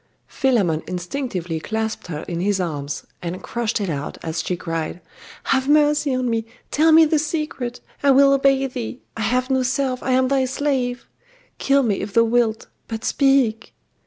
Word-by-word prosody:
Philammon 200 - +1
instinctively 180 - -3
clasped 220 +4 -3
her 155 -3 -5
in 170 -1 -4
his 195 +1 +1
arms, 150 -5 -3 0.2
and 180 +1 -5
crushed 235 -1 -2
it 200 - -2
out, 145 -4 -4
as 160 0 -2
she 180 - -2
cried 165 0 -4 0.4
'Have 265 +1 +1
mercy 295 -2 +3
on 255 0 -1
me! 230 -1 0 0.3
Tell 320 +2 +4
me 320 0 +8
the 310 0 +2
secret! 300 -5 -3 0.2
I 285 - +3
will 275 +1 +6
obey 275 0 +3
thee! 250 -1 -6
I 225 - -5
have 255 +4 0
no 260 0 +3
self 255 0 -1
I 260 - 0
am 260 0 +3
thy 270 0 +2
slave! 260 -2 -1 0.5
Kill 275 0 +3
me, 210 -5 0
if 200 0 -6
thou 230 - +6
wilt: 230 -1 +1 0.2
but 225 0 -5
speak! 270 -5 +2
245 Hz, 175 wpm, -21 LUFS, 195-275 Hz, 0.5 s, me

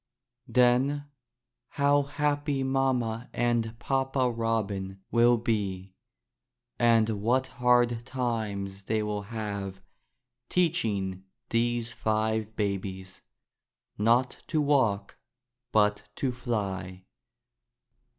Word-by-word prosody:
Then, 130 +3 +3 0.7
how 145 0 +4
happy 145 0 -1
mamma 125 -3 0
and 120 -2 0
papa 135 0 0
Robin 105 -4 -2
will 120 +1 +5
be! 100 -5 -2 0.9
and 115 -2 +5
what 125 +4 +2 0.2
hard 120 -1 +3
times 105 -6 -3
they 110 +1 0
will 105 -1 -2
have 100 -3 -5 0.7
teach 170 -2 +2
ing 95 -3 -2 0.3
these 120 0 0
five 110 0 -1
babies— 95 -2 -3 0.7
not 120 +4 +2
to 155 - 0
walk 130 -9 +1 0.5
but 105 -1 +2
to 135 - -1
fly. 100 -7 -3
115 Hz, 90 wpm, -28 LUFS, 100-125 Hz, 0.9 s, will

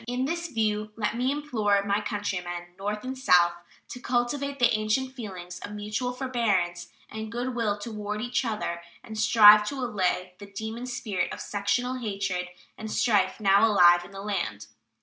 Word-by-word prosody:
In 250 +2 -1
this 335 +4 -2
view, 215 -5 -1
let 215 0 -2
me 250 +3 +1
implore 220 -9 +1
my 200 +1 +1
countrymen, 180 -5 -4
North 205 +3 -4
and 260 +1 -4
South, 180 -9 +4 0.4
to 250 - -7
cultivate 265 +4 -1
the 240 -3 +3
ancient 215 +5 0
feelings 185 -7 -8
of 205 - -8
mutual 210 +4 -3
forbearance 225 -9 -1 0.2
and 220 0 -7
good 245 +2 -3
will 220 -4 0
toward 210 -1 -5
each 245 +3 -1
other 215 -7 -3 0.2
and 220 - -9
strive 210 -1 +8
to 280 - -3
allay 185 -7 -1
the 205 - -10
demon 220 +4 -5
spirit 210 -8 -2
of - - -6
sectional 245 +5 -1
hatred 195 -5 -2 0.3
and 220 - -6
strife 205 -5 +2
now 200 0 +4
alive 175 -4 +6
in 175 - -12
the 195 0 -9
land. 110 - -3
215 Hz, 170 wpm, -27 LUFS, 195-245 Hz, 0.4 s, strive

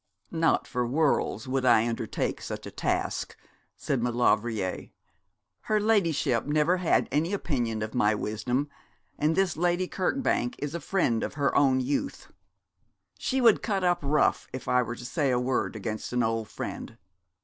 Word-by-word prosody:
'Not 165 -1 +2
for 125 -2 -2
worlds 145 0 +1
would 130 0 0
I 120 -2 +5
undertake 115 -1 -2
such - - -6
a - - -7
task,' - - -2 0.4
said 135 -4 -1
Maulevrier. 115 -4 0 0.7
'Her 215 0 0
ladyship 165 - +1
never 155 +4 +2
had 180 -2 +2
any 160 +7 0
opinion 120 - -1
of 110 - -5
my 110 -4 +2
wisdom, 120 +7 -2 0.5
and 155 +2 +2
this 190 -2 +1
Lady 175 +2 +1
Kirkbank 185 - 0
is 145 +1 -4
a 170 - -3
friend 145 -13 0
of - - -4
her 145 -1 0
own 130 -2 +4
youth. 145 - -3 0.9
She 265 0 0
would 230 -3 +5
cut 200 -4 -1
up 175 -1 +2
rough 145 +1 +1
if 130 - -7
I 125 - +3
were 120 -1 -4
to 120 - -10
say 135 +3 0
a 125 -1 +2
word 125 -2 -1
against 110 +1 -4
an 125 0 +2
old 115 -1 -1
friend. - - -6
135 Hz, 160 wpm, -27 LUFS, 120-170 Hz, 0.9 s, I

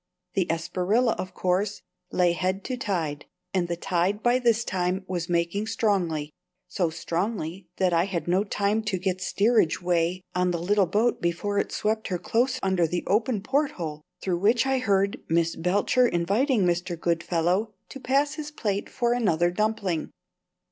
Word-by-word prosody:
The 190 -3 +1
Espriella, 185 +8 +1
of 185 - -5
course, 190 +3 0 0.3
lay 180 -1 +3
head 185 +3 -1
to 255 - -3
tide, 170 - -2 0.3
and 180 -2 +1
the 170 - -2
tide 185 +3 0
by 245 +1 +4
this 235 -2 +2
time 185 -1 -1
was 175 -2 -3
making 170 +5 0
strongly 175 -10 0 0.3
so 175 -3 0
strongly 175 +1 -3
that 185 -2 +2
I 170 +1 +3
had 185 -4 -3
no 185 +3 +3
time 205 +1 0
to 200 -3 0
get 185 0 -2
steerage 200 -5 +2
way 175 0 0
on 180 0 +1
the 175 - 0
little 190 +3 +2
boat 215 +7 +1
before 185 +4 0
it - - -2
swept 220 +1 -1
her 180 - -1
close 245 +8 0
under 190 -3 +2
the 175 +2 -2
open 220 +1 +1
porthole 205 - -1 0.2
through 180 -2 -1
which 230 +6 +3
I 265 -1 +1
heard 200 -4 +1
Miss 165 0 +2
Belcher 200 +8 +2
inviting 205 - +1
Mr. 175 -1 -1
Goodfellow 175 +5 0
to 270 - -8
pass 275 +3 +1
his 305 -1 -5
plate 205 -9 -2
for 240 -1 +1
another 175 -8 +2
dumpling. 205 -4 -1
190 Hz, 165 wpm, -26 LUFS, 175-220 Hz, 0.3 s, by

